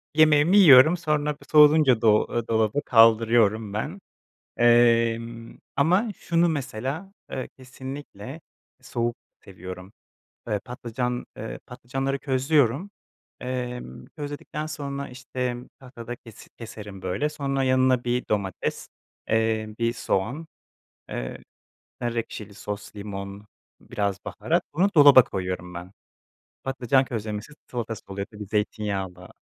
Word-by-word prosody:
Yemeğimi 155 +4 +5
yiyorum, 155 -2 +8
sonra 150 -2 0
b - - -19
soğuyunca 150 -5 +6
do 110 -2 +5
aaa, 120 -1 -2
dolaba 110 +4 +1
kaldırıyorum 115 -3 +4
ben. 150 - -3 0.6
Emm, 115 -1 +3 0.2
ama 180 +10 +3
şunu 170 0 +2
mesela, 140 - -4 0.2
eee, 130 - -4
kesinlikle 130 0 -9 0.4
soğuk 120 -2 -2 0.3
seviyorum: 95 0 -9 0.5
Eee, 105 -3 0
patlıcan, 125 +1 -4
eee, 110 - -6
patlıcanları 135 +3 -3
közlüyorum. 140 - +1 0.5
Emm, 125 - -5
közledikten 145 +1 -5
sonra, 140 -2 -5
işte, 125 -1 -4 0.2
tahtada 120 -2 -8
kesi 115 -3 -15
keserim 105 -4 -9
böyle. 110 +12 -1
Sonra 140 -3 -2
yanına 130 -1 +3
1 125 +1 -1
domates, 100 -3 -2 0.4
eee, 110 -1 0
1 115 0 +1
soğan, 125 +10 -2 0.6
eee, - - -5 0.6
nar 120 -1 -2
ekşili 110 -3 -5
sos, 105 +1 -7
limon, 100 0 -7 0.4
biraz 100 -1 -2
baharat. - - -1
Bunu 185 +6 +3
dolaba 145 -3 +9
koyuyorum 90 -3 -4
ben. 90 +1 -8 0.7
Patlıcan 135 0 +2
közlemesi, 110 +2 -5 0.2
salatası 115 -3 -4
oluyor 100 0 -4
tabii 105 -1 -9
zeytinyağlı. 100 -3 -3
120 Hz, 110 wpm, -25 LUFS, 105-140 Hz, 0.7 s, dolaba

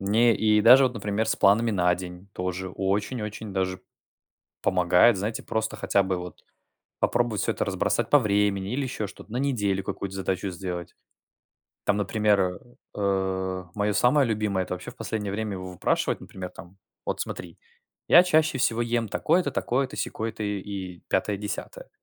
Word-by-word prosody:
мне 110 +4 +4
и 105 -1 +3
даже 130 +4 +8
вот, 125 - 0
например, 105 0 -1
с - - +1
планами 115 +4 +4
на 90 -2 +3
день 90 +1 -9
тоже 90 +1 -3
очень-очень 105 +3 -2
даже 95 -1 -1 0.8
помогает, 90 +4 +4
знаете, 105 +3 -3
просто 110 0 -2
хотя 100 - +2
бы 95 -1 -1
вот 90 0 -9 0.6
попробовать 115 -5 +1
всё - - +1
это - - -2
разбросать - - 0
по 145 - +7
времени 100 -2 +1
или 140 - -1
еще 120 -5 -3
что-то, 100 +2 -13
на 120 - -2
неделю 105 -8 0
какую-то 95 0 -5
задачу 95 0 -2
сделать. 90 -1 -6 0.9
Там 100 0 +2
например, 105 0 +2
э, 90 -1 0 0.4
э, 95 -2 -1
мое 105 0 +1
самое 130 +5 +4
любимое- 105 -4 0
это - - -4
вообще - - -8
в - - -20
последнее 105 -3 -3
время 105 -1 -2
его 95 0 -6
выпрашивать, - - 0
например 90 -1 -7
там: 90 +2 -13 0.3
вот - - -2
смотри, 85 -2 -7 0.5
я 175 - +8
чаще 155 -4 +2
всего 120 -2 +1
ем 115 -2 0
такое-то, 175 - +1
такое-то, 130 +1 -1
сякое-то 110 -1 -3
и 105 -1 -2
и, 95 -3 -7
пятое, 100 +1 0
десятое. - - -6
100 Hz, 165 wpm, -26 LUFS, 95-115 Hz, 0.9 s, даже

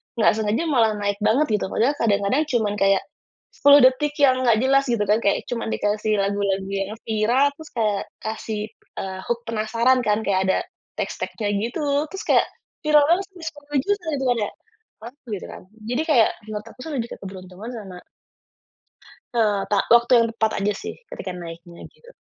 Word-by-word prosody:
nggak 230 - +4
sengaja 220 +7 0
malah 235 -9 +2
naik 205 -1 -2
banget 220 +8 +3
gitu - - -2
padahal 235 +7 +2
kadang-kadang 205 +6 +2
cuman 225 -7 0
kayak, 195 0 +3 0.5
10 285 0 +7
detik 275 +3 +3
yang 270 -3 +5
nggak 230 -3 +4
jelas 275 +1 +4
gitu 235 -4 +1
kan 210 +2 +3
kayak 200 - +1
cuma 235 -2 -3
dikasih 210 0 0
lagu-lagu 195 -1 0
yang 195 0 -2 0.2
viral 225 +5 +2
terus 315 -1 -10
kayak 210 -4 0 0.2
kasih, 220 -1 -4 0.4
eee, 190 -1 -5
hook 240 0 0
penasaran 230 +3 +2
kan 210 +1 +2
kayak 195 -3 +1
ada, 190 - +3 0.4
tes - - -2
tagnya 205 -2 -3
gitu 240 +9 -3 0.2
terus 385 +6 -7
kayak - - +4 0.4
viral 300 -1 +5
kan 335 +4 +4
terus 360 -4 -10
10.000.000 290 +7 -2
gitu 270 - -3
kan 245 - +1
ya - - -6 0.5
mantul 250 +4 -12
gitu 190 - -7
kan - - -10 0.3
jadi 250 +5 0
kayak 250 -8 +5 0.2
menurut 210 0 -5
aku - - -22
tuh - - -5
lebih 235 -3 -2
ke - - -6
keberuntungan 190 +1 -9
sama 195 -5 -8 1.4
Eee, 210 -4 +1
ta 205 - +3 0.2
waktu 235 +1 +3
yang 230 - +2
tepat 220 -1 +1
aja 205 +1 +1
sih - - -6 0.2
ketika 190 - -6
naiknya 170 0 -10
gitu. 475 - -19
220 Hz, 180 wpm, -23 LUFS, 205-260 Hz, 1.4 s, 10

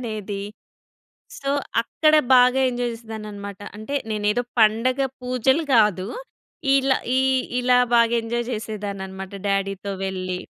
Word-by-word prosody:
ఏంటనేది. 210 -4 -5 1.0
సో, 275 - -3 0.3
అక్కడ 310 +6 +2 0.2
బాగా 250 +1 +5
ఎంజాయ్ 245 0 -2
జేసేదాన్నన్నమాట. 210 -3 -8 0.2
అంటే 220 +7 -6 0.2
నేనేదో 210 +3 0 0.2
పండగ 230 +5 +3 0.2
పూజలు 255 +4 +1
కాదు. 210 -4 +3 0.7
ఇలా 270 0 +2 0.2
ఈ - - +4 0.4
ఇలా 250 0 +4 0.2
బాగా 235 0 +4
ఎంజాయ్ 235 +1 -2
జేసేదాన్నన్నమాట 200 -4 -5
డ్యాడీతో 195 0 -1
వెళ్ళి. 185 -1 -3
220 Hz, 110 wpm, -23 LUFS, 200-245 Hz, 1.0 s, బాగా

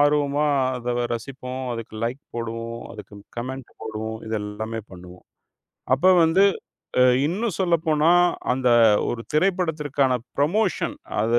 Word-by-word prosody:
ஆர்வமா 145 0 +2 0.3
அத 120 0 -3
வ - - +1
ரசிப்போம், 130 +2 -6
அதுக்கு 115 -1 -8
லைக் 125 +4 -3
போடுவோம், 115 0 -5
அதுக்கு 105 0 -11 0.2
கமெண்ட் 130 +1 -6
போடுவோம், 110 0 -5
இதெல்லாமே 110 +1 -4
பண்ணுவோம். 90 0 -13 0.7
அப்ப 140 +8 0 0.2
வந்து 170 +5 +4 0.6
அ - - +7 0.2
இன்னும் 200 +5 -1
சொல்லப்போனா, 165 -3 +2 0.4
அந்த 130 -1 +1 0.4
ஒரு 115 - -3
திரைப்படத்திற்கான 150 -6 +1 0.2
ப்ரமோஷன் 185 +8 +1 0.3
அது 115 +2 +3
130 Hz, 115 wpm, -23 LUFS, 115-150 Hz, 0.7 s, அ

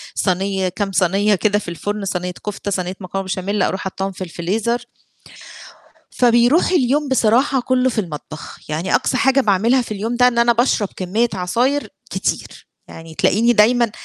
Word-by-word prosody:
صني 190 0 0
كام 200 +2 -3
صنية 195 +3 +2
كده 205 +2 +1
في - - -11
الفرن، 205 +4 -4
صنية 180 -1 -3
كفتة، 205 0 -4
صنية 185 -1 -2
مكرونة 195 0 -5
بشاميل، 190 +2 -2
أروح 190 - -1
حاطّاهم 195 +1 -4
في 185 - -7
الفريزر. 205 +8 -2 1.3
فبيروح 245 +8 +3
اليوم 295 -3 +2
بصراحة 260 +1 +2
كُلّه 255 +1 +1
في 230 -3 -1
المطبخ. 155 -3 -9
يعني 160 +5 0
أقصى 260 - 0
حاجة 270 +2 +3
باعملها 220 +4 +2
في 235 - -8
اليوم 220 +4 -3
ده، 250 +1 +5
إن 245 -1 0
أنا 235 0 +4
باشرب 230 -4 +1
كمية 210 +6 0
عصاير 240 +10 0 0.2
كتير، - - -3 0.2
يعني 165 0 -11
تلاقيني 230 +8 +3
دايمًا 235 +1 +3
210 Hz, 160 wpm, -19 LUFS, 185-240 Hz, 1.3 s, ده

